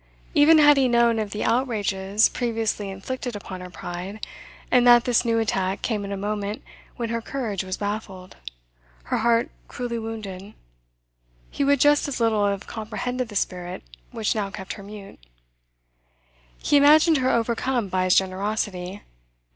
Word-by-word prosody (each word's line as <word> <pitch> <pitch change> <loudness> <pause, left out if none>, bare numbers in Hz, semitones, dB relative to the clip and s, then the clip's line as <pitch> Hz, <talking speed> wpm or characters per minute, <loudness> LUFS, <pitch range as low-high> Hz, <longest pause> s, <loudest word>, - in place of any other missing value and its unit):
Even 315 +1 +6
had 295 -1 +6
he 265 -1 +4
known 235 -1 +3
of 215 -2 -2
the 210 - -4
outrages 210 -4 +1
previously 225 -4 -2
inflicted 240 +5 -5
upon 190 -2 -7
her 180 - -8
pride, 180 +4 -7 0.5
and 245 -1 +5
that 240 -1 +7
this 245 -2 +2
new 230 -1 +1
attack 195 -4 -1
came 215 -4 -1
at 200 - -6
a 200 - -3
moment 205 +1 -3 0.3
when 235 -2 -4
her 230 0 -2
courage 220 -7 -3
was 185 0 -4
baffled, 205 -3 -5 0.7
her - - -1
heart 235 +1 +2 0.2
cruelly 240 -2 -4
wounded, 210 -3 -7 1.0
he - - -1
would 280 0 +3
just 290 +2 +4
as 280 - -4
little 220 -3 +2
have 200 -1 -2
comprehended 245 +3 -4
the 205 - -10
spirit 180 -2 -3 0.3
which 220 -2 -1
now 205 -3 -2
kept 195 -2 -7
her - - -10
mute. 200 0 -11 1.4
He 290 - +2
imagined 305 +3 +6
her 260 -1 +1
overcome 235 0 0
by 185 0 0
his 185 - +4
generosity. 190 0 -2
220 Hz, 155 wpm, -24 LUFS, 195-245 Hz, 1.4 s, that